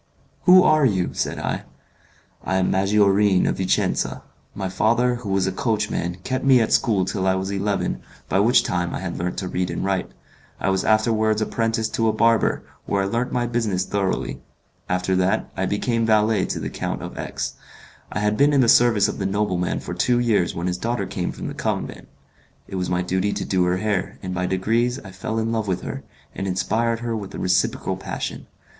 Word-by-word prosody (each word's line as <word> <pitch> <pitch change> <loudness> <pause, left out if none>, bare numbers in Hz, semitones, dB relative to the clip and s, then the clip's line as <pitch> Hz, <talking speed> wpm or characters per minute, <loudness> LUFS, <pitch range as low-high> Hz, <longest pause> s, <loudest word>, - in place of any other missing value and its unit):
"Who 185 0 +8
are 155 -1 +4
you?" 95 -8 +1
said - - -2
I. - - -2 0.8
"I 95 - -1
am 95 -1 +2
Maggiorin, 100 0 +3
of - - 0
Vicenza. 95 -1 0 0.3
My 95 -1 -3
father, 120 +6 +2
who 115 -4 -7
was 95 -1 +1
a 95 - 0
coachman, 95 -5 -1
kept 130 0 -2
me 135 -2 +6
at 110 - +1
school 100 -5 +2
till 95 0 -2
I 95 - +3
was 95 +1 -2
eleven, 100 0 -1 0.3
by 95 - +1
which 120 +5 +4
time 90 -1 -1
I - - -3
had 95 -2 -5
learnt 90 +1 -3
to 95 - -3
read 90 0 -2
and - - -3
write; 95 -2 -1 0.5
I 95 - +1
was 95 0 0
afterwards 110 0 +2
apprenticed 115 0 -1
to 115 - +1
a 110 - +2
barber, 115 0 +2 0.2
where 100 -1 +1
I - - 0
learnt 120 +5 -1
my 120 -1 0
business 110 -6 -1
thoroughly. 100 -2 -2 0.5
After 90 +1 0
that 95 +4 0
I 95 0 -1
became 115 +3 0
valet 110 -2 +3
to - - -3
the - - -4
Count - - -4
of - - -7
X. - - -4 0.6
I 105 - -2
had 105 0 +1
been 145 +1 +4
in 140 - +5
the 120 - +3
service 115 -3 +5
of - - -4
the - - 0
nobleman 95 -3 -1
for - - -6
two 125 -1 +2
years 110 -7 +1
when 85 - -3
his 90 0 -2
daughter 120 +3 -1
came 90 -5 -3
from - - -8
the - - -5
convent. - - -3 0.6
It - - -12
was 90 -1 -2
my 90 0 0
duty 95 +3 0
to - - -3
do 90 -2 +1
her 90 +1 +1
hair, 100 -2 -2
and 90 -1 -4
by 90 0 -1
degrees 115 +7 0
I 95 - -11
fell 95 +4 -4
in 115 0 0
love 110 -2 -1
with 95 -1 -1
her, - - -6 0.3
and 95 - -4
inspired 110 +5 0
her 120 -1 -2
with 100 -3 -6
a - - -5
reciprocal 90 0 0
passion. - - -5
100 Hz, 210 wpm, -22 LUFS, 95-115 Hz, 0.8 s, Who